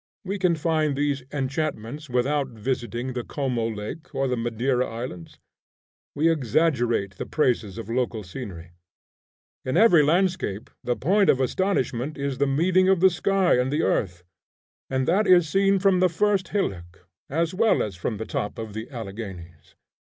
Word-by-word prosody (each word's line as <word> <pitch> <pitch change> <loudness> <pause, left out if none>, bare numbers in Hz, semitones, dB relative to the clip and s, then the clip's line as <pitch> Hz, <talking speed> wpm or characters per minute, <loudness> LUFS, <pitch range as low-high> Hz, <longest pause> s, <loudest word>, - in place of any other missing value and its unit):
We 195 +2 -3
can 180 -3 +3
find 155 -2 0
these 145 -1 0
enchantments 145 -1 -3
without 135 +3 +1
visiting 120 +1 -3
the 120 -1 -3
Como 125 -5 -2
Lake, 115 +10 -7
or 135 0 +1
the 125 - 0
Madeira 120 +2 0
Islands. 115 -8 -7 0.8
We 155 +3 +2
exaggerate 120 - +1
the - - -5
praises 120 -9 0
of - - -6
local 120 -2 -1
scenery. 90 -4 -8 0.9
In 130 - -1
every 210 -8 +6
landscape 170 - 0
the 120 - 0
point 190 - +2
of 130 - +4
astonishment 135 -3 -1
is 140 -2 -3
the 140 - +3
meeting 180 +7 +3
of 190 -2 +4
the 190 +1 +6
sky 185 -3 +2
and 125 +2 0
the 155 +3 +1
earth, 90 -3 0 0.7
and 130 -1 -1
that 195 +5 +2
is 175 -3 +6
seen 195 +4 +3
from 190 -1 +3
the 185 0 +4
first 200 +2 +1
hillock 90 - -4 0.2
as 165 +4 0
well 220 +4 +3
as 100 -4 -5
from 105 +5 -3
the 110 - -5
top 105 - -3
of 110 -2 -6
the 110 +2 -6
Alleghanies. 95 - -8
135 Hz, 160 wpm, -25 LUFS, 115-170 Hz, 0.9 s, every